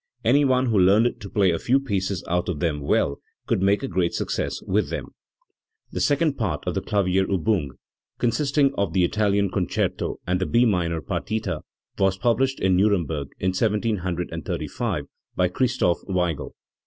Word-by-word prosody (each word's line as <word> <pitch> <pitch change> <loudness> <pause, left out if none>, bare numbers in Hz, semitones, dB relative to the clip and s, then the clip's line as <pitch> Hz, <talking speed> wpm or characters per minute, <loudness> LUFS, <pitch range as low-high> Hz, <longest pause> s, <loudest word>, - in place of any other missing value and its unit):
Any 145 0 +4
one 130 -1 +3
who 110 -5 +2
learned 105 +6 +4
to 100 - -7
play 100 -4 +3
a 85 - -1
few 130 +3 +2
pieces 100 -8 -2
out 90 +1 0
of 80 -5 -2
them 80 -3 -1
well 70 0 +1 0.3
could - - 0
make 100 +1 +2
a - - -1
great 90 -2 0
success - - -2
with - - 0
them"*. - - -5 0.8
The - - -3
second 145 0 +1
part 90 -10 -1
of - - -1
the - - -1
Klavierubung, 95 -3 +1 0.5
consisting 140 +3 +2
of 100 -8 -1
the 90 -1 +3
Italian 100 0 +1
Concerto 90 -3 -1
and 90 +1 0
the 95 - 0
B 120 +1 +4
minor 85 -6 0
partita, 95 - -3 0.4
was 95 -1 +2
published 125 +5 +1
in 95 -1 +2
Nuremberg 85 -8 +1
in 95 - +1
1735 95 -4 -2 0.3
by 90 - +3
Christoph 120 -2 +1
Weigel. 90 -7 -1
95 Hz, 160 wpm, -24 LUFS, 90-115 Hz, 0.8 s, Any